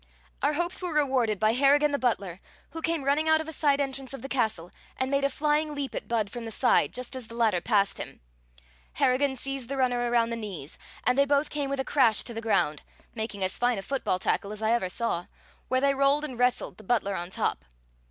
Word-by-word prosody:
Our - - +2
hopes 345 +5 -1
were 360 -1 -3
rewarded 260 -8 +2
by 215 +1 +3
Harrigan 285 +3 +4
the 285 - 0
butler, 200 -8 -1 0.3
who 325 - -6
came 330 -3 -1
running 290 +3 +2
out 315 0 +5
of 315 - -5
a 320 - -5
side 285 -2 +2
entrance 270 -1 -3
of 270 - -11
the - - -4
castle 220 -10 -1 0.3
and 260 +1 -1
made 275 0 +2
a 275 - +3
flying 300 +2 0
leap 280 -2 -4
at - - -5
Budd 220 -4 0
from 240 - -6
the 225 - -5
side, 245 +3 +2
just 250 +1 -4
as 255 -3 -6
the 230 - -10
latter 220 -7 +2
passed 200 -2 +1
him. - - -7 0.7
Harrigan 265 +2 +2
seized 270 -1 -4
the 275 - -3
runner 245 -2 +1
around 235 -1 +2
the - - -1
knees, 195 -10 -7 0.2
and 250 +2 +2
they 280 - +6
both 285 +1 +1
came 290 -2 -2
with 275 0 -2
a 265 - -1
crash 230 -7 +4
to 235 - -7
the 225 - -5
ground 155 -9 +1 0.3
(making 220 -3 -4
as 185 - -1
fine 245 -1 +2
a 195 - -5
football 265 -6 -1
tackle 200 +2 -1
as 215 +1 -6
I 220 - +2
ever 230 -6 +1
saw), 180 -4 -2 0.4
where 255 0 +1
they 280 0 +3
rolled 275 +2 +2
and 255 -5 -7
wrestled, 250 0 +1
the 215 - -13
butler 200 -2 0
on 175 -1 -4
top. - - -2
255 Hz, 235 wpm, -27 LUFS, 220-280 Hz, 0.7 s, they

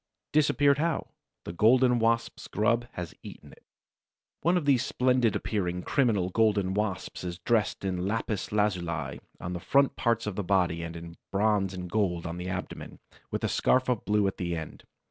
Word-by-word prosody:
Disappeared 145 -1 +4
how? 165 0 -1 0.4
The - - -5
Golden 125 +5 +4
Wasp's 115 +1 0
grub 115 +3 +1
has 90 -2 -6
eaten - - -11
it. - - -18 0.8
One 175 +2 +3
of 165 - -2
these 135 -3 +4
splendid 125 -4 +2
appearing, 90 -4 -2
criminal 110 -10 +1
Golden 105 -3 +2
Wasps 100 -4 -3
is 90 -1 -4
dressed 105 +1 0
in 90 -1 -1
lapis 110 -1 -2
lazuli 85 -9 -1 0.2
on 90 - -5
the 90 - -4
front 140 +9 +2
part 115 -1 0
of 105 -3 -3
the 100 - -2
body 90 -3 +1
and 85 0 -6
in 85 0 -9
bronze 100 -2 +1
and 90 -1 -5
gold 90 -3 0
on 85 0 -4
the 90 +1 -5
abdomen, 95 -1 -6 0.3
with - - -3
a - - +2
scarf 130 0 +2
of 120 -4 0
blue 105 -1 +2
at 95 - -1
the 85 -1 -2
end. 80 -1 -8
105 Hz, 180 wpm, -28 LUFS, 90-120 Hz, 0.8 s, Disappeared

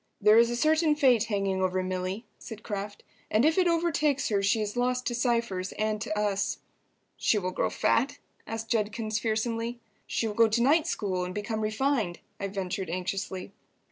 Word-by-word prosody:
"There 210 +2 +6
is 235 0 +5
a 240 - -1
certain 310 +3 +3
fate 250 -6 +4
hanging 195 -3 -1
over 185 0 +1
Milly," 185 +4 -3
said 220 -2 -9
Kraft, 205 0 -5 0.3
"and 220 +5 +3
if 320 +4 +3
it 365 - +4
overtakes 310 -5 +1
her 200 -2 +1
she 200 +3 +2
is 210 0 -3
lost 250 +1 0
to 240 - -1
Cypher's 235 -6 0
and 215 0 -1
to 210 -1 -3
us." 205 -1 0 0.6
"She 220 - +2
will 185 -2 -1
grow - - 0
fat?" 280 +5 +1 0.3
asked 225 0 -5
Judkins, 215 0 0
fearsomely. 230 +1 -2 0.3
"She - - -1
will 215 - -2
go 230 +2 +5
to 220 +2 +1
night 310 +5 +4
school 190 - -1
and 180 0 -5
become 220 +1 -3
refined?" 215 -3 0 0.2
I 200 - -2
ventured 190 -2 -4
anxiously. 185 +2 -4
220 Hz, 180 wpm, -28 LUFS, 200-240 Hz, 0.6 s, There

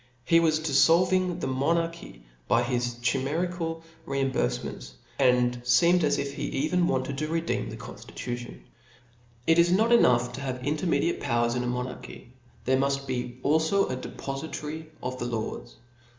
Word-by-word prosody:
He 165 -1 +5
was 160 -2 +2
diflblving 165 +5 +4
^ - - -8
the - - -1
monarchy 135 - -2 0.2
by 120 - +3
his 120 -1 -1
chimerical 165 +6 -1 0.2
reimburfements, 130 - -2 0.3
and 125 -2 +3
feemed 170 +9 +4
as 145 - +2
if 140 0 -4
^e - - -6
even 160 +5 0
wanted 135 +1 -1
to 155 - -1
redeem 165 +1 -1
the - - -7
con - - -9
ilitution. 120 0 -7 0.8
It 165 +1 +4
is 170 +1 +5
not 220 +6 +3
enough 125 - +4
to 140 - -6
have 130 -2 -4
intermediate 165 +3 0
powers 120 0 +1
in 125 - -1
a - - -2
monarchy, 125 0 -6 0.3
there 130 +1 +3
muft 140 0 0
be 125 -2 -4
alfo 160 +6 +2
a - - -1
depofitary 150 +4 -6 0.2
of 130 0 -4
the - - -2
laws. 115 -2 -5
140 Hz, 155 wpm, -27 LUFS, 125-165 Hz, 0.8 s, He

